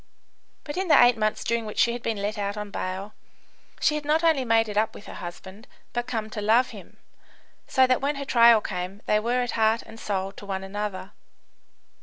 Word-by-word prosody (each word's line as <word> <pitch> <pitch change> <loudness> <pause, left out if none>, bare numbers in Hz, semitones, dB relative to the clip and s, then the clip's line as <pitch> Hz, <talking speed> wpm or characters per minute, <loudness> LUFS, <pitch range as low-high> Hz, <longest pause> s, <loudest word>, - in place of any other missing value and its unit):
But 290 +3 -6
in 380 0 -1
the 320 - +6
eight 245 0 +6
months 215 -1 -1
during 235 0 0
which 210 - -7
she 235 - +3
had 240 - -5
been 225 -2 -2
let 210 +1 -2
out 200 +1 -2
on 210 -1 -6
bail, 190 +3 -4 0.7
she 300 - +2
had 300 -1 -3
not 305 +3 +1
only 320 -5 +3
made 225 -2 +3
it 210 - -6
up 220 +2 +1
with - - -11
her - - -9
husband, 190 +5 -9 0.3
but 240 0 -2
come 220 -3 -3
to 210 - -4
love 230 +5 +3
him, - - -13 0.7
so 260 0 +4
that 255 -1 +1
when 285 +2 0
her 280 0 -5
trial 235 -3 +6
came 185 +2 -5
they 210 - +2
were 245 +3 0
heart 220 0 +2
and 225 - -13
soul 195 -3 -2
to 200 - -12
one 190 -1 -3
another. 195 -1 -5
220 Hz, 215 wpm, -25 LUFS, 205-245 Hz, 0.7 s, the